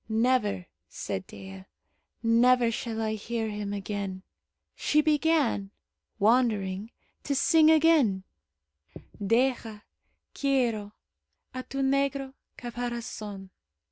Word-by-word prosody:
"Never," 220 Hz, -, +1 dB, 0.2 s
said 95 Hz, -, -5 dB
Dea, 95 Hz, -1 st, -10 dB, 0.6 s
"never 235 Hz, +1 st, +4 dB
shall 225 Hz, 0 st, -4 dB
I 220 Hz, -1 st, -1 dB
hear 225 Hz, +1 st, -3 dB
him 205 Hz, -1 st, -4 dB
again." 200 Hz, -2 st, -4 dB, 0.5 s
She 300 Hz, -, +2 dB
began, 300 Hz, -9 st, +2 dB, 0.5 s
wandering, 215 Hz, -3 st, +2 dB, 0.3 s
to 280 Hz, -, -1 dB
sing 315 Hz, +3 st, +5 dB
again: 305 Hz, -12 st, +4 dB, 1.0 s
"Deja, 230 Hz, -1 st, 0 dB, 0.5 s
quiero, 235 Hz, -7 st, 0 dB, 0.6 s
A 255 Hz, -, -4 dB
tu 275 Hz, +1 st, -4 dB
negro 275 Hz, 0 st, 0 dB, 0.2 s
Caparazon." 235 Hz, -5 st, -6 dB
230 Hz, 90 wpm, -28 LUFS, 205-265 Hz, 1.0 s, sing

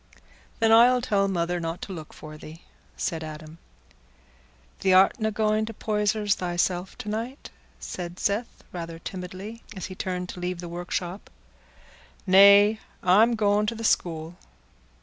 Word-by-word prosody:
"Then 225 Hz, -1 st, +3 dB
I'll 240 Hz, +3 st, +7 dB
tell 200 Hz, -5 st, +1 dB
mother 175 Hz, -2 st, -1 dB
not 165 Hz, +1 st, -4 dB
to 195 Hz, -, -6 dB
look 160 Hz, -4 st, -9 dB
for 155 Hz, 0 st, -11 dB
thee," 155 Hz, +2 st, -12 dB, 0.3 s
said 165 Hz, -3 st, -3 dB
Adam. 155 Hz, +1 st, -9 dB, 1.2 s
"Thee 195 Hz, -, 0 dB
artna 215 Hz, +4 st, +4 dB
going 215 Hz, 0 st, 0 dB
to 225 Hz, -, -7 dB
Poyser's 210 Hz, -1 st, 0 dB
thyself 180 Hz, 0 st, -2 dB
to 250 Hz, -, -8 dB
night?" 230 Hz, +6 st, -5 dB, 0.3 s
said 175 Hz, -1 st, -6 dB
Seth 205 Hz, +5 st, -2 dB
rather 170 Hz, -2 st, -6 dB
timidly, 185 Hz, +6 st, -8 dB
as 190 Hz, -, -5 dB
he 185 Hz, -, -7 dB
turned 180 Hz, -1 st, -4 dB
to -, -, -7 dB
leave 180 Hz, 0 st, -3 dB
the 175 Hz, -, -6 dB
workshop. 175 Hz, +2 st, -5 dB, 1.0 s
"Nay, 200 Hz, +3 st, +7 dB, 0.2 s
I'm 215 Hz, +6 st, +5 dB
going 210 Hz, -1 st, +2 dB
to 230 Hz, -, -2 dB
th' 225 Hz, 0 st, -5 dB
school." 165 Hz, -3 st, 0 dB
190 Hz, 145 wpm, -26 LUFS, 175-215 Hz, 1.2 s, I'll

